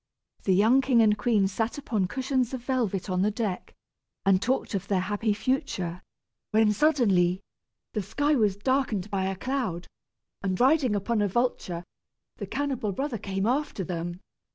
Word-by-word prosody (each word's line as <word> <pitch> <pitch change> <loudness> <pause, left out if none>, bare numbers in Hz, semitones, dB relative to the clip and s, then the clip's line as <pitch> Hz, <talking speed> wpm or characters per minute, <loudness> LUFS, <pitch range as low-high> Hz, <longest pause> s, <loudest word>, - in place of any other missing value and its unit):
The 190 - +4
young 225 +7 +5
king 255 -3 +3
and 210 -1 +4
queen 210 -3 +2
sat 220 +6 -2
upon 220 -9 -1
cushions 260 +2 -1
of 245 - -8
velvet 235 -8 -1
on 185 -1 0
the 205 - +3
deck, 210 -4 -4 0.5
and 195 -1 +4
talked 255 +1 -1
of 195 -1 -2
their 195 -2 +1
happy 210 +3 -1
future, 205 - -2 0.5
when 215 0 +4
suddenly 200 - +3 0.5
the 215 - -1
sky 290 +10 0
was 210 -7 +2
darkened 240 -4 0
as - - -14
by 190 -1 0
a 190 0 -1
cloud, 225 -7 -2 0.6
and, 190 -2 -1
riding 265 -3 +4
upon 210 +2 0
a 205 - +2
vulture, 190 -5 -1 0.5
the - - -5
cannibal 270 -7 -2
brother 265 +2 -3
came 195 -1 -2
after 255 -4 0
them. 175 +1 -4
210 Hz, 165 wpm, -27 LUFS, 190-255 Hz, 0.6 s, young